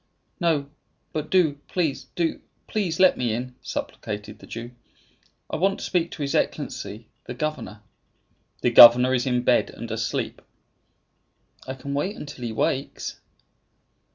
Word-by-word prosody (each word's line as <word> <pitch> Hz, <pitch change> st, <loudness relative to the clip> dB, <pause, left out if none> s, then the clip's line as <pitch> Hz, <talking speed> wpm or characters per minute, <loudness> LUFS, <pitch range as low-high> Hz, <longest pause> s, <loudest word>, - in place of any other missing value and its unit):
"No; 160 Hz, -5 st, +1 dB, 0.5 s
but 155 Hz, 0 st, -3 dB
do, 160 Hz, -7 st, +3 dB
please 160 Hz, -7 st, -1 dB
do, 170 Hz, -2 st, -1 dB, 0.2 s
please, 185 Hz, -6 st, -2 dB
let 185 Hz, -1 st, +5 dB
me 120 Hz, -3 st, 0 dB
in," 125 Hz, +2 st, -5 dB
supplicated 105 Hz, 0 st, -5 dB
the -, -, -14 dB
Jew. 115 Hz, +1 st, -7 dB, 0.8 s
"I -, -, -3 dB
want 195 Hz, +3 st, +2 dB
to -, -, -6 dB
speak 175 Hz, -2 st, 0 dB
to 150 Hz, -, -5 dB
his 140 Hz, -, -2 dB
Excellency, 110 Hz, +2 st, -2 dB, 0.2 s
the 125 Hz, -, -6 dB
governor." 130 Hz, -7 st, -4 dB, 0.8 s
"The 125 Hz, -, +2 dB
governor 120 Hz, +2 st, +9 dB
is 125 Hz, 0 st, +1 dB
in 125 Hz, -1 st, +1 dB
bed, -, -, +3 dB
and -, -, -8 dB
asleep." -, -, -2 dB, 1.3 s
"I 130 Hz, -, -4 dB
can 140 Hz, +2 st, -6 dB
wait 185 Hz, +9 st, -1 dB
until 145 Hz, -4 st, -8 dB
he -, -, -2 dB
awakes." 130 Hz, +4 st, -2 dB
140 Hz, 145 wpm, -25 LUFS, 120-165 Hz, 1.3 s, governor